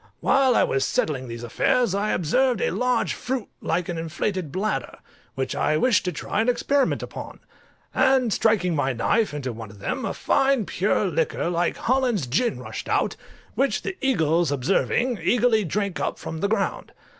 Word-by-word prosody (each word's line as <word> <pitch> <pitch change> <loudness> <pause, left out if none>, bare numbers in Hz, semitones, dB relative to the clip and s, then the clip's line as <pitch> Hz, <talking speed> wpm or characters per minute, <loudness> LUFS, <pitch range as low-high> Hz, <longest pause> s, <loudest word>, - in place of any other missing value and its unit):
While 265 -2 +3
I - - +5
was 135 - +1
settling 130 -4 -1
these 115 0 -7
affairs 195 - +1
I 205 +2 0
observed 245 - +1
a - - 0
large 250 -1 0
fruit 255 -4 -4
like 175 -1 -1
an 170 -2 -3
inflated 170 0 -3
bladder, 185 - -2 0.4
which 135 0 -2
I 155 - +1
wished 235 +4 +3
to 180 - 0
try 180 +6 -2
an 230 - +1
experiment 265 +3 +1
upon: - - -8 0.5
and 255 -5 +3
striking 180 -6 +2
my 135 -3 0
knife 215 - +1
into 135 -4 -4
one 110 -1 -8
of 100 - -14
them, 100 - -3
a - - -3
fine 270 -5 +2
pure 200 +3 0
liquor 165 0 -1
like 175 0 0
Hollands 245 - +1
gin 205 - 0
rushed - - -7
out, - - +1 0.4
which 275 +1 0
the 380 - -4
eagles 170 - +2
observing, 195 - +1
eagerly 235 -2 +3
drank 200 +1 -2
up - - -2
from 160 - -6
the 200 - +1
ground. 210 -2 -2
195 Hz, 175 wpm, -24 LUFS, 155-245 Hz, 0.5 s, I